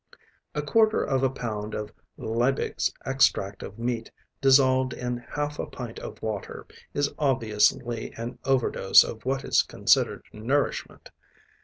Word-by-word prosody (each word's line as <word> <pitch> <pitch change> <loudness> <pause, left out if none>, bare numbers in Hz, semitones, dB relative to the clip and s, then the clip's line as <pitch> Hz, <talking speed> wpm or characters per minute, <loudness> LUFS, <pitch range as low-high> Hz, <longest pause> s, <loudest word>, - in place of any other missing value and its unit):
A 150 - -1
quarter 220 +8 +3
of 135 -1 0
a 135 - +3
pound 110 -5 -5
of 105 -1 -5 0.3
Liebig's 120 +4 0
Extract 105 -7 +2
of 100 - -8
Meat 115 -1 -3 0.3
dissolved 130 -1 +4
in 125 0 -3
half 145 +5 -4
a - - -3
pint 120 -3 -7
of - - -8
water 110 -3 -5 0.3
is 145 0 -1
obviously 120 -2 +1
an 115 +2 -6
over 135 -2 +2
dose 95 - +6
of 110 0 -8
what 135 +1 -1
is - - +3
considered - - +1
nourishment. 130 +7 -2
125 Hz, 140 wpm, -26 LUFS, 110-135 Hz, 0.3 s, dose